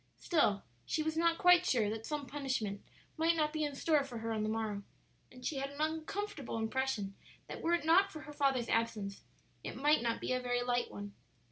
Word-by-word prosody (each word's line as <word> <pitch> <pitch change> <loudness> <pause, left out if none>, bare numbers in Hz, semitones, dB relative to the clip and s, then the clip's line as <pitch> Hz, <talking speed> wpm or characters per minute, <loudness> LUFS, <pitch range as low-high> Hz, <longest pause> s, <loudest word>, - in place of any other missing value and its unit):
Still 250 - +2 0.2
she 310 - -1
was 315 0 -1
not 335 0 +3
quite 360 -2 +6
sure 240 - +2
that 220 0 -5
some 295 -2 -2
punishment 260 -9 -2 0.4
might 325 +1 +3
not 305 -1 +1
be 310 -1 0
in 290 -2 -2
store 300 0 +3
for 255 -4 -7
her 225 0 -3
on 220 -1 -1
the 215 - 0
morrow. 215 -2 -2 0.5
And 250 0 -12
she 295 - -1
had 275 +1 -2
an 285 +1 -11
uncomfortable 315 - -2
impression 220 -3 -1 0.3
that - - -7
were 335 - +1
it 335 - -3
not 370 +5 +5
for 310 - -8
her 295 - -9
father's 270 -5 +1
absence 220 -4 -1 0.4
it - - -5
might 295 +1 +4
not 230 -1 0
be - - -1
a 255 - +1
very 245 0 0
light 245 -1 0
one. 205 0 -7
270 Hz, 215 wpm, -34 LUFS, 225-315 Hz, 0.5 s, quite